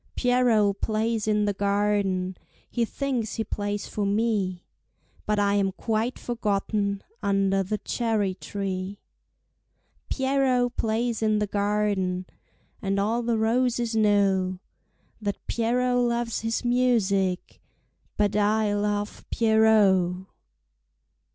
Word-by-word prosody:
Pierrot 240 -5 +2
plays 220 0 0
in 210 -1 +2
the 205 - 0
garden, 200 -2 0 0.3
He 235 -1 0
thinks 250 -3 -2
he 225 - -1
plays 205 -1 -3
for 210 - -3
me, 200 -3 0 0.6
But 210 0 +1
I 200 0 +2
am 200 -1 +2
quite 225 +4 -1
forgotten 205 -3 -1 0.2
Under 195 -1 +2
the 205 +3 -2
cherry 215 -2 -1
tree. 195 0 -4 1.1
Pierrot 265 -2 +1
plays 225 +1 -1
in 215 -1 +2
the 210 - +1
garden, 200 -3 0 0.6
And 195 0 0
all 220 +4 +1
the 235 -1 0
roses 235 +1 +1
know 195 -3 +2 0.6
That 205 -1 -2
Pierrot 245 +2 +1
loves 235 -1 0
his 225 +2 -2
music, 210 -7 +1 0.6
But 205 -1 +1
I 210 0 +2
love 205 0 -2
Pierrot. 215 -5 +4
210 Hz, 110 wpm, -26 LUFS, 200-230 Hz, 1.1 s, Pierrot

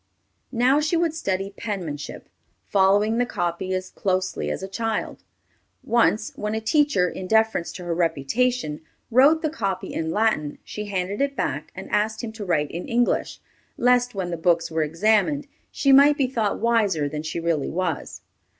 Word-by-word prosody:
Now 255 +5 +3
she 310 +3 +1
would 330 -2 +1
study 195 - -2
penmanship, 170 -11 -5 0.4
following 205 - +3
the 245 - +3
copy 175 -2 -2
as 185 0 -4
closely 185 -1 -1
as - - -4
a - - -3
child. 225 +2 -3 0.6
Once 225 -2 +2
when 210 +1 -3
a - - 0
teacher, 225 -5 +2
in 185 +1 -6
deference 220 -4 +2
to 180 - -8
her 175 -1 -2
reputation, 165 - 0 0.3
wrote 285 +7 +5
the 310 - +1
copy 195 - -3
in 160 0 -2
Latin, 185 -7 0
she 210 - -6
handed 195 +2 -2
it 280 0 0
back - - -3
and - - -8
asked 215 +2 0
him 225 - -4
to 220 -1 -7
write 155 -6 0
in 170 - -5
English, 240 +1 0 0.4
lest 245 -1 +3
when 185 -2 -3
the 170 - -2
books 170 0 +1
were 160 0 0
examined, 215 - +2 0.2
she 275 - +1
might 285 +2 +7
be 275 - +2
thought 230 -5 -1
wiser 210 -10 +2
than 150 +1 -4
she 160 +2 -4
really 165 -4 0
was. 175 -3 -3
205 Hz, 170 wpm, -24 LUFS, 175-240 Hz, 0.6 s, might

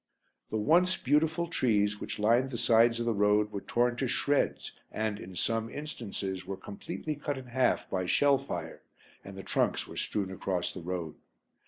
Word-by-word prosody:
The 110 - -1
once 175 - +4
beautiful 155 +5 +2
trees 105 -9 +1
which - - -4
lined 115 +5 +3
the 125 - -4
sides 115 +1 +4
of 120 - -1
the 115 - +2
road 105 +1 +3
were 100 - -4
torn 120 0 +1
to 130 - 0
shreds 140 +3 0 0.2
and, 110 -1 -2
in 95 -3 -9
some 115 +5 -1
instances, 105 -10 -5
were 95 +1 -5
completely 150 - -5
cut 145 -1 -3
in 130 - -8
half 125 +1 +1
by 95 -1 -2
shell 140 +6 +4
fire 85 -12 -6 0.4
and 100 0 -10
the 95 - -7
trunks - - 0
were - - -10
strewn 100 -3 -2
across 95 -1 -2
the 90 - -7
road. 85 -2 -4
110 Hz, 180 wpm, -30 LUFS, 95-130 Hz, 0.4 s, once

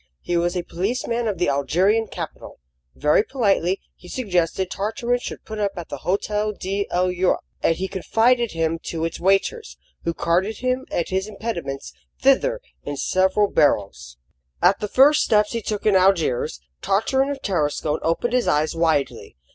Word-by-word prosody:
He 175 - -2
was 175 +1 +1
a 175 - -2
policeman 230 +6 -2
of 205 -3 -1
the 175 - +1
Algerian 180 - +2
capital. - - -8 0.4
Very 150 +5 +3
politely, 195 -7 +1 0.2
he 180 - -16
suggested 185 -4 -1
Tartarin 235 +4 -1
should - - -7
put 215 -1 -6
up 200 -1 0
at 175 -3 -7
the 145 - -5
Hotel 210 +4 -1
de 200 +1 -3
l'Europe, 180 +1 +1 0.2
and 165 - +2
he 190 +3 -3
confided 230 +5 +1
him 165 0 -1
to 165 -1 -2
its 165 - -4
waiters, 195 - 0 0.3
who 170 0 -2
carted 190 +6 0
him 255 +1 -1
and 170 - -1
his 190 +2 -1
impedimenta 170 -11 -5 0.3
thither - - +3 0.2
in 145 -1 -5
several 190 +6 +2
barrows. 100 - 0 0.4
At 180 +3 +4
the 210 - -2
first 280 +7 +5
steps 210 -2 +2
he 230 - -2
took 210 -1 -4
in 210 -2 +4
Algiers, 165 - +2 0.2
Tartarin 265 +8 +1
of 285 -1 -3
Tarascon 150 -4 0
opened 170 +9 0
his 250 -1 +2
eyes 150 +2 +1
widely. 160 -4 0
190 Hz, 165 wpm, -22 LUFS, 165-225 Hz, 0.4 s, first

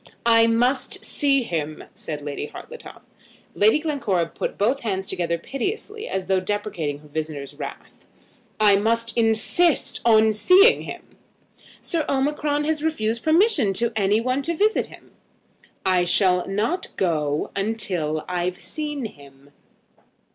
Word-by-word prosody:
"I 230 -1 +6
must 245 +4 0
see 275 -2 +2
him," 155 -7 -4
said 150 -2 -6
Lady 145 0 -4
Hartletop. 480 - -11 0.5
Lady 215 +6 +4
Glencora 275 - 0
put 165 - -5
both 240 +7 +1
her 230 - -4
hands 190 -1 -2
together 175 -3 -2
piteously, 410 - -4
as 190 -1 -3
though 190 -1 +2
deprecating 185 -7 -3
her 150 - -16
visitor's 150 -2 -5
wrath. - - -9 0.6
"I 205 -2 +5
must 230 +2 0
insist 230 +8 +2
on 220 -1 +5
seeing 370 - +5
him." - - -10 0.6
"Sir 335 -3 -1
Omicron 290 +2 0
has 305 0 -1
refused 230 -8 -1
permission 315 - +3
to 235 +4 0
any 205 0 +2
one 255 +4 0
to 335 +4 -2
visit 430 +2 +2
him." - - -16 0.7
"I 185 -2 +3
shall 180 0 +2
not 215 - -2
go 155 -5 0 0.3
till 155 -7 -2
I've 180 0 -2
seen 295 -2 -5
him. 140 -6 -13
220 Hz, 135 wpm, -23 LUFS, 180-280 Hz, 0.7 s, I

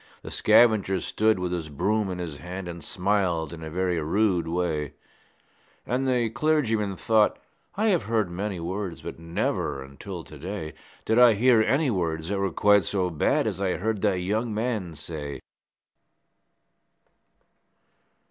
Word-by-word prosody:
The - - -8
scavenger 105 -5 +4
stood 110 +5 +1
with 90 -1 -2
his 85 -3 -3
broom 100 +8 0
in 90 - -4
his 85 -5 -5
hand, 90 +3 -7
And 85 -1 -7
smiled 90 -5 0
in 80 - -9
a 80 - -6
very 90 +1 0
rude 90 +1 +1
way; 80 -4 -1 0.9
And 130 +2 -1
the 120 -3 +1
clergyman 115 -7 +1
thought, 110 -2 +3 0.4
'I 210 +3 0
have 180 -5 +2
heard 110 -3 +1
many 95 +1 -3
words, 90 +1 -4
But - - -7
never, 80 -4 -2
until 85 +6 -8
to 75 - -12
day, 85 -2 -5 0.3
Did 110 +2 +3
I 120 -3 +7
hear 120 +1 +5
any 135 +5 +2
words 80 -4 -2
that 100 -1 -1
were 100 0 +1
quite 100 +3 +4
so 95 -3 -1
bad 135 - +1
As 100 -3 -2
I 95 -2 +1
heard 105 +1 -2
that 100 -3 +2
young 110 +5 -1
man 105 -6 -2
say.' 75 -1 -6
95 Hz, 155 wpm, -26 LUFS, 85-110 Hz, 0.9 s, I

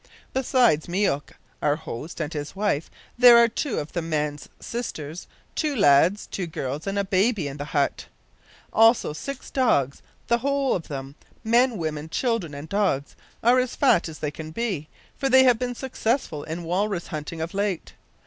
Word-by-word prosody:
Besides 250 - +3
Myouk, 175 -6 0 0.3
our 145 - +2
host, 155 0 -7
and 155 -1 -3
his 150 +3 -5
wife, 195 -7 0 0.3
there 245 -1 +9
are 235 0 +7
two 235 +3 -3
of 150 - -4
the 170 - -1
man's 150 -2 -2
sisters, 165 -9 -6 0.3
two 300 -3 -1
lads, 170 - +4
two 185 -3 -4
girls, 145 +1 -4
and 195 +1 -1
a 200 - +2
baby 195 -2 +1
in 140 0 -6
the 145 - -5
hut. 145 -2 -1 0.7
Also 225 -7 +4
six 275 - -7
dogs. 140 - +1 0.2
The 235 0 +2
whole 275 +1 +1
of 170 - -3
them 135 -1 -6 0.3
men, 235 +1 +3
women, 155 -2 -4
children, 215 - -1
and 145 +2 -7
dogs, 185 -7 0 0.3
are 245 +3 +5
as 255 -1 -1
fat 180 - +3
as 155 - -9
they 150 -1 -3
can 155 +1 -8
be, 180 -5 -3 0.3
for 270 - -1
they 260 0 +7
have 250 -3 +4
been 245 -1 -2
successful 235 - -2
in 165 +2 -5
walrus 185 +2 -1
hunting 155 +2 -5
of 160 +1 -4
late. 200 -3 -2
180 Hz, 175 wpm, -25 LUFS, 150-235 Hz, 0.7 s, there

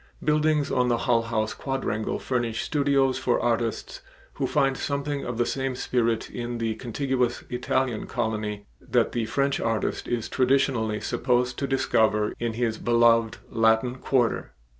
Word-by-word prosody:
Buildings 150 -1 +2
on 125 -1 +2
the 120 -1 +2
Hull 115 -1 +2
House 110 -1 -1
quadrangle 135 -5 -2
furnish 120 -3 -2
studios 140 -3 +2
for 120 - +1
artists 115 -1 -1 0.3
who - - -2
find 135 -2 +2
something 140 0 -2
of 120 -2 -4
the 120 - +2
same 135 -1 -2
spirit 115 -3 0
in 120 0 -5
the 115 -1 -1
contiguous 125 +1 -1
Italian 125 -1 -1
colony 105 -3 -3 0.2
that 120 -2 +1
the 115 -2 -1
French 140 +2 0
artist 115 -1 -1
is 120 -2 -2
traditionally 130 -5 +1
supposed 125 +1 0
to 140 - -1
discover 110 -5 +2
in 120 -1 -1
his 115 -1 -1
beloved 115 -1 +3
Latin 115 +2 +2
Quarter. 125 -4 0
120 Hz, 145 wpm, -26 LUFS, 115-135 Hz, 0.3 s, beloved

